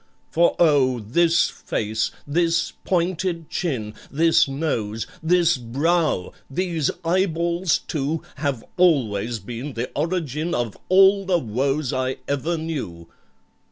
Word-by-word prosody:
"For, 170 +1 +3
oh! 140 -7 +4
this 165 +10 +3
face—this 145 +10 -1
pointed 175 -2 -1
chin— 120 - -2 0.2
This 160 +1 +4
nose—this 160 +6 0
brow—these 155 - -1 0.2
eyeballs 170 0 +1
too, 150 +1 -3
Have 140 -5 -2
always 120 - +2
been 120 +7 -6
the 120 +1 -4
origin 160 0 -1
Of 120 -4 -2
all 195 +1 +6
the 185 -2 +3
woes 135 +2 -1
I 130 0 -1
ever 145 +5 -1
knew! 130 - -5
155 Hz, 100 wpm, -23 LUFS, 125-170 Hz, 0.2 s, all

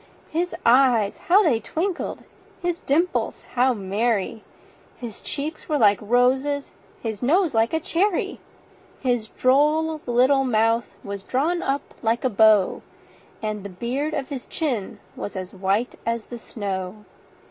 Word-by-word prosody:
His 345 +3 -1
eyes 240 -4 +4
how 395 +4 +7
they 265 - +3
twinkled! 340 - -3 0.4
his 350 -1 -2
dimples 330 +6 0
how 250 0 +3
merry! 210 +2 -1 0.5
His 235 -4 -8
cheeks 305 +3 -5
were 300 - +2
like 205 -5 +5
roses, 260 +5 +1 0.3
his 220 -3 -4
nose 330 +6 +2
like 225 0 +2
a 320 - +1
cherry; 365 +3 0 0.6
His 245 -4 0
droll 300 +6 +2
little 260 +3 +4
mouth 230 -1 +1
was 200 -1 -5
drawn 310 - 0
up 275 +1 -2
like 230 +1 0
a 255 - +1
bow, 215 -2 +4 0.6
And 215 -1 -2
the 200 - -6
beard 255 - -2
on 275 - -2
his 265 -2 -7
chin 250 - -2 0.2
was 205 - -6
as 185 0 -6
white 195 +5 0
as 230 -1 -2
the 240 - -8
snow. 200 -2 -5
245 Hz, 140 wpm, -23 LUFS, 215-295 Hz, 0.6 s, how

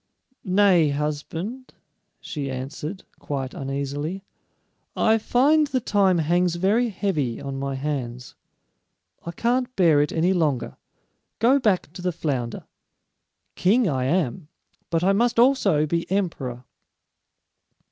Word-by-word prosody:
"Nay, 185 -4 +4
husband," 155 - -4 0.4
she 140 -3 -5
answered, 145 +8 -6 0.2
quite 135 -2 -4
uneasily, 140 +6 -4 0.7
"I 225 0 +3
find 290 +7 +3
the 265 -2 0
time 200 -5 +2
hangs 170 +2 +1
very 210 +7 +2
heavy 165 - -2
on 135 -1 -5
my 135 0 -3
hands. 130 -3 -4 0.9
I 170 - -5
can't 245 +6 -1
bear 165 -6 +4
it 145 - 0
any 175 +3 +2
longer. 155 -8 0 0.6
Go 255 +5 +4
back 195 - 0
to 180 - -8
the 180 0 0
flounder. 130 -8 -3 0.9
King 220 +5 +2
I 130 -5 0
am, 160 +1 -1 0.4
but 165 0 0
I 195 +2 +4
must 235 +4 +1
also 220 - +4
be 170 +2 -2
emperor." 150 -11 -2
170 Hz, 120 wpm, -24 LUFS, 140-205 Hz, 0.9 s, Nay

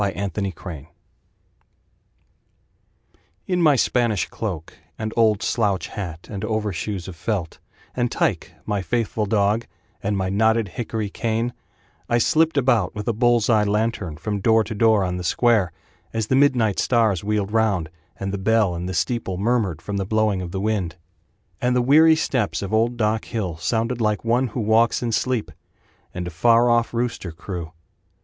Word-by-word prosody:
Andy 100 0 -2
The 105 - -3
Night 95 -2 -5
Watch 80 -7 -6 2.6
In 180 -1 0
my 150 -4 +5
Spanish 120 -5 +1
cloak, 90 -8 -5 0.2
And 110 0 -4
old 110 -3 +3
slouch 100 -5 0
hat, 85 -5 -6
And 100 -1 -6
overshoes 105 -3 -2
of 95 - -8
felt, 90 -2 -3 0.4
And 120 -1 0
Tyke, - - -1
my 105 -2 -1
faithful 110 0 -1
dog, 105 +2 +1 0.3
And 100 0 -1
my 95 -1 -1
knotted 110 +1 +2
hickory 110 +1 -4
cane, 115 +1 -1 0.6
I 120 - +3
slipped 160 +5 +2
about 120 -8 +2
with 105 -1 -5
a 115 - +2
bull's 120 0 +3
eye 110 -3 +4
lantern 105 -6 -1
From 105 +4 -3
door 110 +2 +4
to 110 - -6
door 110 -1 +3
on 90 -1 -2
the 90 - -5
square, 110 -2 +2 0.4
As 110 -1 -1
the 130 - +1
midnight 125 -7 +3
stars 110 -7 +2
wheeled 105 -1 -1
round, 105 -7 +1 0.3
And 95 0 -3
the 100 - -2
bell 110 -2 +2
in 85 +1 -4
the 95 - -4
steeple 95 +1 -1
murmured 100 -6 0
From 100 +2 -3
the 100 - 0
blowing 110 -3 +1
of 90 - -5
the 95 +2 -4
wind; 100 -5 -1 0.7
And 125 0 +1
the - - +3
weary 160 +5 +6
steps 125 -10 -1
of 100 - -5
old 115 +2 +2
Doc 110 0 0
Hill 100 -8 -3
Sounded 115 +6 -1
like 105 0 0
one 120 +3 +2
who 120 +2 -4
walks 110 +3 +3
in 120 - -1
sleep, 125 0 -1 0.6
And 90 0 -5
a 90 - -5
far 115 +8 +4
off 120 0 +2
rooster 115 -7 -2
crew. 85 -1 -7
110 Hz, 170 wpm, -22 LUFS, 95-115 Hz, 2.6 s, weary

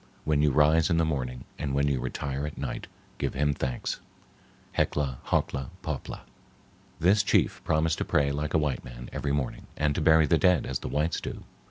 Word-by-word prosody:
When 75 -1 +2
you 75 - +4
rise 75 +4 +4
in 85 - +2
the 85 - +3
morning, 65 -5 -2 0.2
and 70 -3 -2
when 70 +1 +2
you 70 -3 +1
retire 70 +2 -3
at 75 - -8
night, - - -4 0.3
give - - -1
him 75 +1 +2
thanks. 65 -2 -3 0.8
Heccla 70 -4 0
Hockla 70 -1 0
Popla." 75 -4 -4 0.8
This 95 +5 +5
chief 100 - +2
promised 80 0 +1
to - - +1
pray 70 -1 +2
like 75 +1 -2
a - - +6
white 75 -5 0
man - - -9
every 70 - -1
morning, 70 -2 -2
and 75 -1 +2
to - - -1
bury 80 -1 +6
the 80 +2 +3
dead 90 -2 +4
as 65 - -2
the - - -5
whites 75 +3 0
do. - - -6
75 Hz, 195 wpm, -28 LUFS, 70-80 Hz, 0.8 s, a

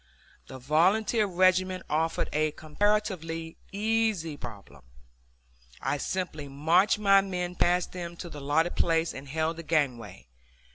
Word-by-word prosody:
The 130 - -9
volunteer 190 - +2
regiment 185 0 +2
offered 160 +2 0
a 155 0 +1
comparatively 165 -1 -1
easy 215 -6 0
problem. 105 -8 -10 1.0
I 145 - -1
simply 155 -3 -3
marched 165 +10 +3
my 195 -2 +5
men 180 -2 -3
past 180 0 +1
them 175 -1 -6
to 175 - -7
the 150 -3 -9
allotted 150 +5 +1
place 165 0 +1
and 135 +1 -9
held 160 +3 -1
the 165 - -7
gangway. 125 - -1
165 Hz, 130 wpm, -28 LUFS, 150-185 Hz, 1.0 s, my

